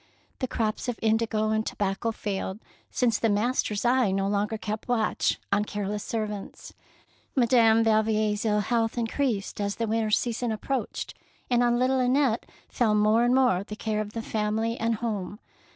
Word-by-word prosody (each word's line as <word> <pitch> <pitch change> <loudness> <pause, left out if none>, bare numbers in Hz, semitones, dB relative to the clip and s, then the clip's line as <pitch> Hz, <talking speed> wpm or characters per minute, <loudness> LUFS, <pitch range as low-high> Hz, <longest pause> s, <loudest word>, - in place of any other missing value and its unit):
The 255 - -1
crops 220 0 -2
of 245 -3 -2
indigo 220 -1 +1
and 220 0 +1
tobacco 205 +2 -2
failed, 195 -3 -4 0.3
since 235 -4 +1
the 225 - +2
master's 215 0 0
eye 245 -2 +3
no 195 +1 0
longer 205 +2 0
kept 215 0 -5
watch 235 -3 +1
on 205 - +3
careless 205 0 -3
servants. 210 -3 -5 0.6
Madame 230 -3 +5
Yalvier's 215 -1 +2
ill 210 -2 +2
health 225 +2 0
increased 230 -3 -1
as 200 0 -1
the 230 - -1
winter 220 0 0
season 235 +2 0
approached, 255 +5 -3 0.4
and 245 0 +4
on 240 0 +3
little 260 +1 +2
Annette 255 -1 +2 0.2
fell 220 -3 +1
more 215 +2 +4
and 245 +1 +3
more 250 -8 +3
the 210 - -7
care 215 -1 -2
of 210 0 -6
the 230 - -4
family 220 +2 -1
and 230 -1 0
home. 210 -3 -4
220 Hz, 165 wpm, -27 LUFS, 210-235 Hz, 0.6 s, Madame